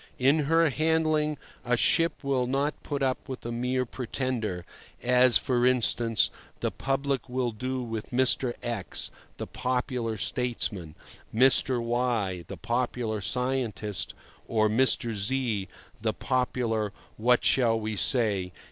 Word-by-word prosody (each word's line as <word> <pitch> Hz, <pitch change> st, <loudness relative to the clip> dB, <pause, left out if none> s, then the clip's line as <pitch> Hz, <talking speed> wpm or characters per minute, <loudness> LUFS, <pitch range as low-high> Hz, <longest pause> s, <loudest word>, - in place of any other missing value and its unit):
In 145 Hz, +3 st, +3 dB
her 165 Hz, +1 st, +3 dB
handling 155 Hz, 0 st, +1 dB, 0.3 s
a 125 Hz, 0 st, +1 dB
ship 165 Hz, +7 st, +2 dB
will 135 Hz, -3 st, 0 dB
not 140 Hz, +3 st, -1 dB
put 140 Hz, -2 st, -3 dB
up 130 Hz, +1 st, -1 dB
with 130 Hz, -3 st, -6 dB
a 120 Hz, -, -3 dB
mere 125 Hz, +2 st, -1 dB
pretender, 120 Hz, -7 st, -3 dB, 0.4 s
as, 125 Hz, 0 st, +6 dB
for 125 Hz, -2 st, 0 dB
instance, 120 Hz, -2 st, +3 dB, 0.3 s
the -, -, -1 dB
public 135 Hz, -1 st, -2 dB
will 125 Hz, -1 st, -1 dB
do 130 Hz, +3 st, -3 dB
with 115 Hz, -2 st, -5 dB
Mr. 125 Hz, 0 st, +2 dB
X, 115 Hz, -7 st, 0 dB, 0.3 s
the -, -, -4 dB
popular 125 Hz, -3 st, -2 dB
statesman, 100 Hz, -8 st, -1 dB, 0.4 s
Mr. 130 Hz, +1 st, +4 dB
Y, 115 Hz, -6 st, -1 dB
the -, -, -7 dB
popular 120 Hz, -2 st, -2 dB
scientist, 115 Hz, -2 st, -1 dB, 0.3 s
or 110 Hz, -1 st, +2 dB
Mr. 120 Hz, +1 st, +2 dB
Z, 105 Hz, -1 st, -1 dB, 0.3 s
the 110 Hz, -1 st, 0 dB
popular—what 120 Hz, -2 st, -1 dB
shall 115 Hz, -4 st, +3 dB
we 110 Hz, 0 st, -3 dB
say? 105 Hz, -7 st, +1 dB
125 Hz, 125 wpm, -27 LUFS, 110-130 Hz, 0.4 s, as